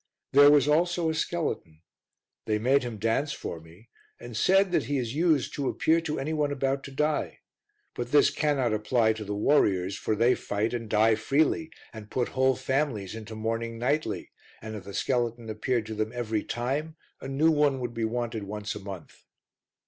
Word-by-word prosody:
There 145 +1 +8
was 145 -2 +5
also 170 +2 +2
a - - -2
skeleton; 155 - -3 0.6
they 105 - +1
made 130 +6 +3
him 120 -4 -5
dance 115 +7 0
for 85 - -6
me 85 +8 -18 0.3
and 120 -1 -9
said 190 - +3
that - - +1
he 145 - -1
is 120 -2 -2
used 155 -3 +2
to 140 -2 -1
appear 165 +1 +2
to 155 -2 -3
any 150 +4 -2
one 150 -2 0
about 135 0 -1
to 140 - -8
die; 150 +2 -1 0.5
but - - -5
this 420 - +5
cannot 140 -7 +1
apply 110 +1 +2
to 110 0 -7
the 105 0 -4
warriors, 100 -6 +2
for 110 - -1
they 120 +4 +4
fight 105 +1 -2
and 115 -3 -4
die 110 +1 +4
freely, 150 +8 +1 0.2
and 110 -2 -10
put 125 -2 -1
whole 130 0 +2
families 130 -7 -1
into 110 0 -8
mourning 115 +1 -3
nightly, 145 +6 -1 0.3
and 110 -1 -7
if 100 -3 -8
the 100 - -8
skeleton 120 -2 -1
appeared 115 +1 -1
to 110 - -6
them 110 0 -2
every 110 -3 -1
time, 140 +6 -3 0.3
a - - -6
new 145 +4 +3
one 145 -3 +2
would 120 -2 -4
be 115 - -3
wanted 115 -2 -2
once 105 +1 -4
a - - -7
month. 95 -4 -10
120 Hz, 190 wpm, -27 LUFS, 110-145 Hz, 0.6 s, There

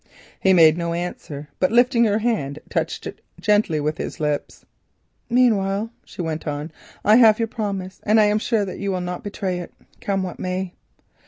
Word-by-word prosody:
He 190 - +3
made 165 -2 +6
no 170 0 -1
answer, 160 -4 -5
but 185 - +2
lifting 240 0 +4
her 210 -1 +2
hand 215 - -1
touched - - -2
it - - -7 0.2
gently 205 -7 +2
with 150 +2 -2
his - - -5
lips. 150 -1 -3 0.6
"Meanwhile," 220 -3 +2
she 180 - -7
went 160 0 -4
on, 150 +2 -4 0.3
"I 215 +2 +7
have 220 -3 +7
your 230 - 0
promise, 200 -4 -4
and 215 +1 +3
I 215 - +6
am 210 +1 +2
sure 220 -2 0
that 185 - -7
you 200 0 -1
will 185 - -1
not 180 0 -5
betray 190 -3 -3
it, 175 - -8 0.3
come 195 -1 -1
what 180 - -6
may." 185 0 -3
190 Hz, 185 wpm, -22 LUFS, 170-215 Hz, 0.6 s, I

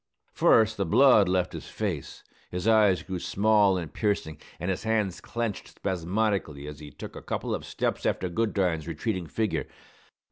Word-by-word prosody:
First, 110 0 +4
the 100 - 0
blood 110 -1 +6
left 90 -1 +1
his - - -7
face, - - -4 0.3
his 90 +3 -3
eyes 105 -6 +4
grew 95 0 -4
small 100 0 +3
and 85 -5 -5
piercing, 90 -8 -1 0.2
and 90 +3 -1
his 95 - -3
hands 110 -5 0
clenched 115 -3 -3
spasmodically 95 -5 -2
as 75 -1 -8
he 75 - -9
took - - -10
a - - -7
couple - - -3
of - - -3
steps - - -2
after 95 - 0
Goodine's 90 -4 0
retreating 85 +2 -3
figure. 110 +4 -1
95 Hz, 165 wpm, -27 LUFS, 85-110 Hz, 0.3 s, blood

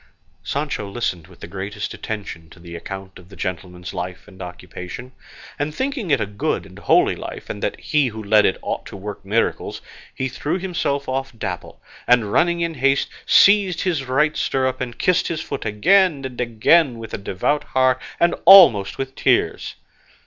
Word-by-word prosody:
Sancho 140 -8 -3
listened 95 -7 -3
with - - -19
the - - -7
greatest 100 +3 -5
attention 95 -7 -6
to 85 - -16
the 85 0 -10
account 95 +3 -8
of 90 0 -17
the 100 - -13
gentleman's 90 0 -5
life 90 +1 -6
and 95 -2 -14
occupation; 90 +6 -8 0.5
and 145 +1 -2
thinking 260 - -2
it 140 - +3
a - - 0
good 100 0 -2
and - - -13
a - - -16
holy - - +3
life, - - -7
and - - -7
that - - -2
he 150 -3 +1
who 110 -2 -6
led 105 +1 +4
it 95 - +2
ought - - -3
to - - -9
work 100 +1 -7
miracles, 105 +4 -1 0.4
he 130 - -2
threw 145 +6 -2
himself 170 -7 -2
off 135 +1 -2
Dapple, 95 -5 -5 0.3
and 115 -4 +3
running 170 0 +2
in 170 -1 -1
haste 135 -1 +1 0.2
seized 200 -3 +5
his 160 -7 -1
right 150 +4 +1
stirrup 130 -1 -1
and 120 -2 -5
kissed 180 -1 +2
his 165 - -2
foot - - -5
again 145 - +3
and 125 -1 -5
again 120 +4 +3
with 115 -1 -9
a - - -3
devout 100 +10 -1
heart 130 -1 +1 0.2
and 170 - +3
almost 170 - +8
with 135 0 -4
tears. - - 0
120 Hz, 185 wpm, -21 LUFS, 95-150 Hz, 0.5 s, almost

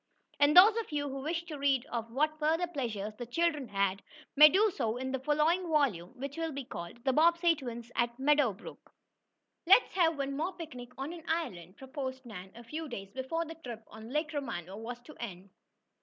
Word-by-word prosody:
And 290 +3 +5
those 410 +4 +10
of 455 -7 -3
you 290 -1 -1
who 270 0 -5
wish 330 +4 -2
to 310 -4 -8
read 275 -2 +2
of 230 -1 -3
what 305 +5 0
further 325 +3 +2
pleasures 230 - -4
the 240 - -4
children 300 0 0
had, 195 -1 0 0.3
may 300 +1 +10
do 410 +5 +3
so 225 +1 -1
in 260 +1 -3
the 265 - -1
following 305 +6 +2
volume, 260 - +1
which 275 +3 -5
will 325 -1 -2
be 275 -2 -5
called 235 +5 -8
"The 265 - +3
Bobbsey 335 +3 +4
Twins 240 -4 -7
at 235 0 0
Meadow 290 -2 +3
Brook." 190 - -12 0.8
"Let's 390 +7 +6
have 330 -4 +3
one 275 0 -2
more 330 +6 -2
picnic 255 -8 -8
on 275 +5 -4
an 330 -2 -10
island!" 210 - -3
proposed 265 -1 -6
Nan, 190 -5 -9
a 235 - -11
few 310 +6 -6
days 195 -5 -7
before 265 +7 -2
the 325 - -7
trip 245 -9 -9
on 220 +1 -11
Lake 300 +3 -1
Romano 210 - -4
was 235 +3 -6
to 300 +5 -13
end. 195 -4 -7
275 Hz, 200 wpm, -31 LUFS, 235-315 Hz, 0.8 s, those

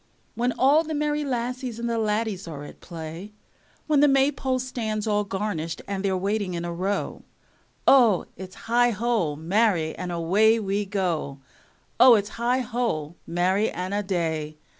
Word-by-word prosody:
When 240 +2 0
all 285 +5 +4
the 315 -1 -4
merry 300 0 0
lassies 250 -2 -3
and 235 0 -3
the 230 -1 -1
laddies 210 -3 -1
are 150 -3 -7
at - - -12
play, 170 +4 -8 0.5
When 300 -2 +3
the 295 - +6
maypole 270 -1 +2
stands 230 -5 -3
all 210 -1 +1
garnished 190 -5 -4
and 195 -1 -3
they're 190 -1 +1
waiting 200 -1 -1
in 170 0 -3
a 170 - -4
row, 195 +4 -2 0.6
O, 235 -8 +5
its 185 0 -9
heigho, 235 -7 +1
marry, 170 0 +1
and 180 -1 -5
away 200 +7 +3
we 205 0 -1
go. 180 -8 -2 0.6
O, 250 -2 +9
its 205 -1 -1
heigho, 235 - -1
marry, 185 +5 +1
and 185 +2 -4
a 205 - +1
day! 160 -5 -2
205 Hz, 155 wpm, -25 LUFS, 175-240 Hz, 0.6 s, O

